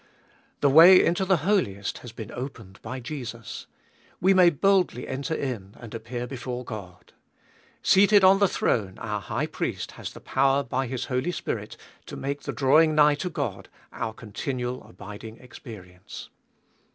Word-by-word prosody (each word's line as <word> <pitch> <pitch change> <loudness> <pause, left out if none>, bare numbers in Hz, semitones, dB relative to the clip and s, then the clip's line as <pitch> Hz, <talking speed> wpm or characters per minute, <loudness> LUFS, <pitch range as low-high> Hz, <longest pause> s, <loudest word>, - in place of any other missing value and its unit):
The 140 - +4
way 170 +6 +9
into 175 +3 +1
the 180 -5 +1
Holiest 105 - 0
has 120 - -10
been 110 -1 -8
opened 115 -7 -8
by 130 - -6
Jesus. 120 -4 -7 0.5
We 190 +2 +4
may 180 -2 +6
boldly 180 -4 +1
enter 140 +5 -3
in 110 -10 -5
and 115 -3 -10
appear 120 +2 -5
before 125 -1 -6
God. 100 -6 -9 0.7
Seated 205 +1 +5
on 190 +1 +7
the 200 - +5
throne 100 - -1
our 105 -2 -4
High - - -2
Priest - - -4
has - - -8
the - - -11
power 135 +1 +1
by 130 0 -2
His 130 0 -4
Holy 130 +6 -1
Spirit - - -5 0.3
to - - -7
make 140 +1 -4
the - - -4
draiving 155 +3 +4
nigh 150 -1 +6
to 180 +5 -3
God 170 - -4 0.2
our 115 - -3
continual 125 +3 -5
abiding 105 +4 -10
experience. 100 -8 -11
130 Hz, 155 wpm, -26 LUFS, 115-155 Hz, 0.7 s, way